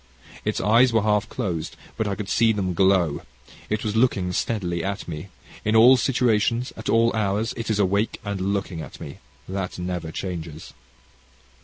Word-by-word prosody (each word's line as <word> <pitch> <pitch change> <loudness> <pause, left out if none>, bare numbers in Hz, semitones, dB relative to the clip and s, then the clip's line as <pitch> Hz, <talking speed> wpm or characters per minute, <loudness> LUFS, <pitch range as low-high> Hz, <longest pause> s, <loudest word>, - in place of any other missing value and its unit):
Its - - -1
eyes 115 +5 +4
were 110 -2 +2
half 105 0 +1
closed, 90 -10 -3 0.2
but 110 - -1
I 100 - -1
could 100 0 -5
see 115 +2 +3
them 95 -4 -1
glow. 95 -4 +2 0.5
It 105 0 -1
was 105 -1 -2
looking 100 -7 +2
steadily 90 -5 -1
at 100 +1 -4
me. 80 +2 -6 0.4
In 110 +1 +1
all 120 +4 +8
situations, 120 -1 +1
at - - -6
all 115 +1 +3
hours, 105 +1 0
it 115 -1 -5
is 110 - +1
awake 100 +2 +1
and 100 -2 -3
looking 95 -4 -3
at - - -10
me. 70 - -9 0.3
That 95 -1 -4
never 90 -2 -4
changes. 80 -3 -6
100 Hz, 170 wpm, -24 LUFS, 90-110 Hz, 0.5 s, all